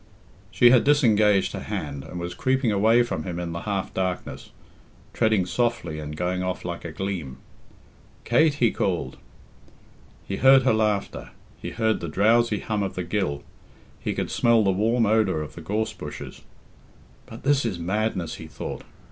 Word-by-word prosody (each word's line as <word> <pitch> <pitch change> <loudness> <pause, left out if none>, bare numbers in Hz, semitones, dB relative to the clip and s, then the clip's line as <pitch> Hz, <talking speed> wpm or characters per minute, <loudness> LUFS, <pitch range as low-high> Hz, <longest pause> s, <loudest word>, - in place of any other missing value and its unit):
She 120 0 +5
had 125 - +5
disengaged 110 -8 +3
her - - -4
hand, 70 -2 -5
and 90 - -8
was 85 0 -4
creeping 130 0 +1
away 110 +4 +4
from 120 -9 -3
him 85 0 -5
in 85 -1 -4
the 85 - -4
half 100 -2 -2
darkness, 95 -1 -3 0.6
treading 110 -4 +2
softly 90 -4 -1
and 75 0 -7
going 90 +2 -1
off 90 -1 -3
like 85 -1 -5
a 85 - -6
gleam. 80 -7 -4 0.9
"Kate!" 155 -2 +3
he 120 -5 +2
called. 85 -9 -2 1.1
He 95 - -3
heard 135 0 +6
her 130 - +3
laughter, 105 -2 -1 0.3
he - - -4
heard 110 -1 0
the 85 - -5
drowsy 110 +4 +2
hum 105 -2 -2
of 95 - -3
the 90 - -3
gill, 85 -6 -2 0.6
he - - -3
could - - -3
smell 115 -2 +3
the 100 - +3
warm 115 +5 +2
odour 105 -7 +2
of 75 - -9
the 85 - -10
gorse 110 +6 -2
bushes. 75 -7 -8 0.9
"But 115 - -11
this 140 0 +3
is 110 -7 -2
madness," 95 0 -2
he 80 - -9
thought. 75 - -6
100 Hz, 170 wpm, -24 LUFS, 85-115 Hz, 1.1 s, heard